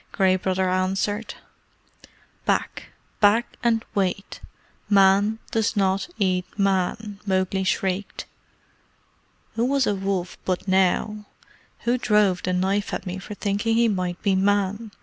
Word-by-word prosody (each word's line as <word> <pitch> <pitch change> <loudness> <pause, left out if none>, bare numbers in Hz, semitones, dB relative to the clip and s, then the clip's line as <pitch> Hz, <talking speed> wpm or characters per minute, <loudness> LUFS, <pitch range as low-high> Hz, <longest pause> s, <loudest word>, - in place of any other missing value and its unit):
Gray 190 -2 +3
Brother 185 0 0
answered. 195 +4 -1 1.1
"Back! - - -1 0.3
Back 215 +3 +3
and 225 -2 +1
wait! 195 0 -2 0.5
Man 200 +2 +4
does 225 0 0
not 195 - +1
eat 185 -3 +1
Man!" 200 +1 0
Mowgli 190 0 0
shrieked. 190 +1 -2 1.3
"Who 230 - -1
was 270 +1 +2
a 205 - +1
wolf 190 -2 -3
but 185 +1 -2
now? 190 +3 +1 0.5
Who 245 +1 +1
drove 210 -5 +2
the 185 - -2
knife 190 +3 0
at - - -6
me 185 +1 -4
for 205 +2 -8
thinking 205 +3 0
he 235 0 +4
might 185 -4 -2
be 200 -3 +2
Man?" 205 +3 +1
195 Hz, 130 wpm, -24 LUFS, 185-210 Hz, 1.3 s, Man